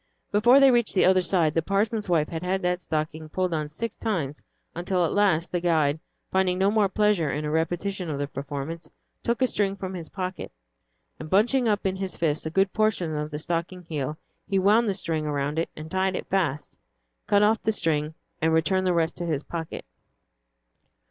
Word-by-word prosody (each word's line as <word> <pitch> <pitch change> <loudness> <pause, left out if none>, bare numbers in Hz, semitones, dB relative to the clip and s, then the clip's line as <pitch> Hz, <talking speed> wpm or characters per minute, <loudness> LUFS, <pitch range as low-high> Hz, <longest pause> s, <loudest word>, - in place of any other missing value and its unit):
Before 240 +6 +6
they 275 -1 +7
reached 240 -4 +2
the 185 - +5
other 185 0 +5
side, 170 -4 +1
the 165 - +2
parson's 205 +3 0
wife 160 -3 +2
had 165 -1 -4
had 185 +1 -1
that 180 0 0
stocking 155 -1 -3
pulled 185 +1 -1
on 155 -2 -2
six 225 +10 -3
times, 160 -10 -3 0.3
until 175 +1 0
at - - -1
last, 190 -5 +2
the 175 - 0
guide, 160 -4 +2 0.3
finding 185 -1 +2
no 195 +2 +3
more 210 -2 +3
pleasure 210 -6 +2
in 150 +2 -2
a 150 - -2
repetition 175 +3 -1
of 145 - -2
the 145 - -1
performance, 145 +4 -6 0.3
took 235 +2 0
a - - +6
string 200 -4 0
from 190 -1 -6
his 170 -4 -7
pocket, 185 -1 -5 0.7
and 155 - -7
bunching 240 +7 +3
up 205 -2 0
in 190 0 0
his 190 -1 -4
fist 155 -1 0
a - - -2
good 195 +3 +1
portion 215 -7 +1
of 150 0 -3
the 150 - -5
stocking 170 +3 -3
heel, 150 -2 -4 0.3
he 195 - +1
wound 210 +4 +4
the 195 - 0
string 160 -4 -2
around 145 +1 -1
it 165 - -1
and 155 +1 -9
tied 190 0 +1
it - - -4
fast, 160 -7 -2 0.5
cut 205 0 +4
off 220 +2 +3
the 220 - +1
string, 155 -5 -1 0.3
and 160 +1 +2
returned 185 +4 +2
the 180 - +2
rest 165 -1 +1
to 175 - -3
his 150 -3 -1
pocket. 165 -2 -6
175 Hz, 205 wpm, -26 LUFS, 155-195 Hz, 0.7 s, they